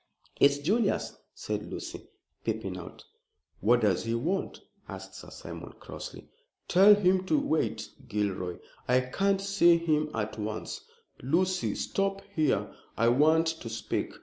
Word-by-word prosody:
"It's 140 Hz, 0 st, +5 dB
Julius," 200 Hz, +9 st, 0 dB, 0.2 s
said -, -, -3 dB
Lucy, -, -, -7 dB, 0.4 s
peeping -, -, -2 dB
out. -, -, -9 dB, 0.6 s
"What 120 Hz, +4 st, +4 dB
does 100 Hz, -5 st, +2 dB
he 115 Hz, 0 st, 0 dB
want?" 175 Hz, +11 st, -2 dB, 0.3 s
asked -, -, -8 dB
Sir -, -, -10 dB
Simon, -, -, -9 dB
crossly. -, -, -9 dB, 0.4 s
"Tell 195 Hz, +3 st, +7 dB
him 185 Hz, -2 st, +3 dB
to 305 Hz, -, +3 dB
wait, 160 Hz, -, -1 dB, 0.2 s
Gilroy. 100 Hz, -5 st, -2 dB, 0.3 s
I 125 Hz, +1 st, +4 dB
can't 195 Hz, +10 st, +1 dB
see 195 Hz, -4 st, +4 dB
him 155 Hz, -2 st, +1 dB
at 110 Hz, 0 st, -3 dB
once. 110 Hz, +1 st, -4 dB, 0.4 s
Lucy, 180 Hz, +8 st, +1 dB
stop 195 Hz, 0 st, -1 dB
here, 135 Hz, -, +1 dB, 0.2 s
I 115 Hz, +1 st, +4 dB
want 155 Hz, +6 st, +4 dB
to 160 Hz, -7 st, -3 dB
speak." 110 Hz, 0 st, -3 dB
155 Hz, 135 wpm, -29 LUFS, 115-190 Hz, 0.6 s, Tell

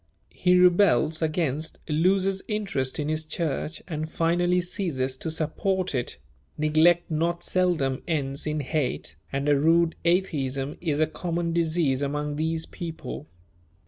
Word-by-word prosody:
He 180 Hz, 0 st, +3 dB
rebels 180 Hz, -3 st, +4 dB
against, 155 Hz, -1 st, -1 dB
loses 190 Hz, +5 st, +2 dB
interest 200 Hz, -, -1 dB
in 150 Hz, -, -2 dB
his 155 Hz, 0 st, -1 dB
church, 155 Hz, 0 st, -3 dB
and 155 Hz, -2 st, -4 dB
finally 175 Hz, +2 st, +2 dB
ceases 160 Hz, -8 st, -2 dB
to 160 Hz, -, -4 dB
support 180 Hz, +4 st, -1 dB
it; 125 Hz, -3 st, -2 dB, 0.4 s
neglect 160 Hz, +3 st, +3 dB
not 170 Hz, +2 st, 0 dB
seldom 165 Hz, -8 st, +1 dB
ends 140 Hz, -3 st, -1 dB
in 155 Hz, 0 st, -1 dB
hate, 140 Hz, -1 st, -2 dB, 0.2 s
and 140 Hz, +1 st, -2 dB
a 145 Hz, -, +5 dB
rude 165 Hz, +3 st, +3 dB
atheism 145 Hz, -6 st, 0 dB
is 155 Hz, -4 st, 0 dB
a 155 Hz, -, +5 dB
common 170 Hz, +1 st, -3 dB
disease 160 Hz, -5 st, +1 dB
among 145 Hz, +1 st, -2 dB
these 160 Hz, +1 st, -1 dB
people. 160 Hz, -, -7 dB
160 Hz, 135 wpm, -26 LUFS, 145-175 Hz, 0.4 s, a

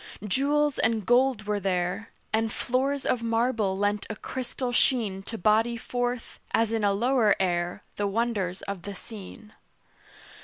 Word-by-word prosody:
Jewels 290 Hz, +6 st, +2 dB
and 220 Hz, -3 st, +1 dB
gold 245 Hz, -1 st, +3 dB
were 210 Hz, 0 st, 0 dB
there; 185 Hz, +2 st, -1 dB, 0.2 s
And 220 Hz, 0 st, +1 dB
floors 270 Hz, +3 st, 0 dB
of 245 Hz, -, +1 dB
marble 230 Hz, -4 st, +1 dB
lent 205 Hz, +1 st, 0 dB
a 215 Hz, -, -3 dB
crystal 250 Hz, +2 st, -4 dB
sheen 225 Hz, -6 st, +2 dB
To 225 Hz, +4 st, -6 dB
body 220 Hz, +4 st, +3 dB
forth, 245 Hz, +1 st, -3 dB, 0.2 s
as 225 Hz, -1 st, +2 dB
in 225 Hz, -2 st, 0 dB
a 200 Hz, -, +4 dB
lower 230 Hz, 0 st, +3 dB
air, 175 Hz, -2 st, 0 dB
The 205 Hz, -, +1 dB
wonders 200 Hz, -4 st, -1 dB
of 200 Hz, -3 st, -4 dB
the 200 Hz, +3 st, -7 dB
scene. 215 Hz, +2 st, -10 dB
220 Hz, 150 wpm, -27 LUFS, 200-245 Hz, 0.2 s, a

